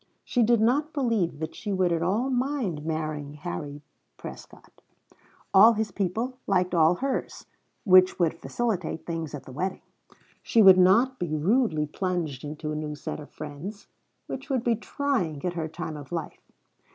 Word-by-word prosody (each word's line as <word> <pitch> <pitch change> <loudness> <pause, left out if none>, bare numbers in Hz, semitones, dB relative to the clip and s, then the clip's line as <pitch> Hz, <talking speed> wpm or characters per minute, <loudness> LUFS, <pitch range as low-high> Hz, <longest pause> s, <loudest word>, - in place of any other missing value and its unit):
She 245 - 0
did 235 0 +4
not 280 +8 +2
believe 230 - 0
that 160 +1 -5
she 210 - -5
would 185 -2 +2
at 165 -1 0
all 215 +10 0
mind 250 - -1
marrying 155 -2 -3
Harry 150 -2 -6 0.3
Prescott. - - -12 0.7
All 215 +4 +8
his 215 -1 -2
people 220 +8 -2
liked 185 -2 +1
all 165 0 +5
hers, 270 +6 -3 0.4
which 185 -4 +6
would 170 -3 +2
facilitate 185 -2 -3
things 165 -3 -4
at 140 - -8
the - - -12
wedding; 185 +8 -3 0.6
she 225 - +4
would 190 -1 +9
not 230 +9 +4
be 160 -3 -2
rudely 165 - +2
plunged 160 -4 -3
into 150 +1 -5
a - - -3
new 150 -1 -4
set 145 - -6
of 150 - -10
friends, 155 +8 -8 0.4
which 265 - -7
would 260 -4 0
be 235 -2 +2
trying 210 - -2
at 180 - -1
her 165 -2 -3
time 160 0 -6
of 145 0 -11
life. 165 -3 -6
180 Hz, 165 wpm, -26 LUFS, 155-230 Hz, 0.7 s, would